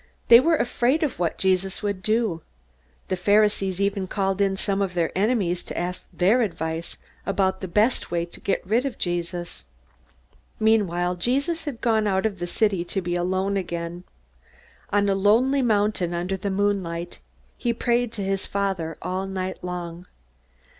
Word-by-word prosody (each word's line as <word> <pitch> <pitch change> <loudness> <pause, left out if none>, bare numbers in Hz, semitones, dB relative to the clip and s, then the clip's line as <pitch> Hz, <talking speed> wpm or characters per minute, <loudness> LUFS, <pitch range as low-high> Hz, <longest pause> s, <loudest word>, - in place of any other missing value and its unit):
They 235 - +11
were 325 +5 +3
afraid 255 +3 +1
of 280 - -2
what 170 -2 0
Jesus 190 +1 0
would 200 -2 -2
do. 215 -5 0 0.7
The 185 - +1
Pharisees 200 0 +2
even 200 -1 0
called 195 0 -1
in 195 -1 +2
some 195 0 -1
of 190 -2 -1
their 170 -2 0
enemies 195 -4 +1
to - - -7
ask 180 +1 -3
their 205 +8 +3
advice 165 -5 -3 0.3
about 190 -1 0
the 190 - -3
best 210 +8 +2
way 170 -1 -1
to 170 - -11
get 195 - -1
rid 225 +6 +2
of 265 - -6
Jesus. 175 0 -3 0.9
Meanwhile 180 -5 +2
Jesus 280 - 0
had 275 -6 -5
gone 220 -3 +2
out 190 +1 +1
of 200 -4 -1
the 175 - -3
city 195 -1 +1
to 195 - -2
be 175 -1 -3
alone 190 +3 0
again. 170 -1 -4 0.9
On 205 0 +2
a 200 - +3
lonely 230 +8 +3
mountain, 205 -6 +1
under 180 +3 -1
the 190 +1 -3
moon 200 0 +1
light, 170 0 -6 0.4
he 240 - -1
prayed 240 0 0
to 205 - -3
his 195 0 -1
Father 190 -5 -2
all 185 +1 -2
night 190 -1 -4
long. 175 -1 -5
195 Hz, 165 wpm, -24 LUFS, 180-215 Hz, 0.9 s, They